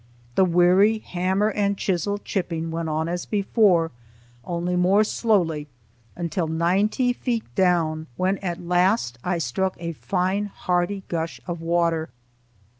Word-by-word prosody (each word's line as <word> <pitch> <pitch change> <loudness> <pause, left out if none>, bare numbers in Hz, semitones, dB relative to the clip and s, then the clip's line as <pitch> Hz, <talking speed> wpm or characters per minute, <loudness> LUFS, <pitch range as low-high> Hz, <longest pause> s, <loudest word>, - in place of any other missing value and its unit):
The 190 - +4
weary 180 +5 +4
hammer 190 +1 0
and 200 -1 0
chisel 195 +2 -1
chipping 165 -5 -3
went 165 0 -3
on 155 +1 -1
as 175 +1 -3
before, 200 -5 +2 0.5
only 175 +1 -2
more 185 +4 +4
slowly, 175 -10 +1 0.5
until 170 0 -2
ninety 195 +10 +1
feet 240 -2 -2
down, 165 -4 +1
when 185 +1 +1
at 175 -2 -3
last 175 - +1
I 180 -1 0
struck 170 +6 -1
a 170 0 -3
fine, 185 +4 -1
hearty 185 0 -1
gush 165 -1 -3
of 175 -2 -5
water. 165 -1 +1
180 Hz, 130 wpm, -24 LUFS, 165-195 Hz, 0.5 s, The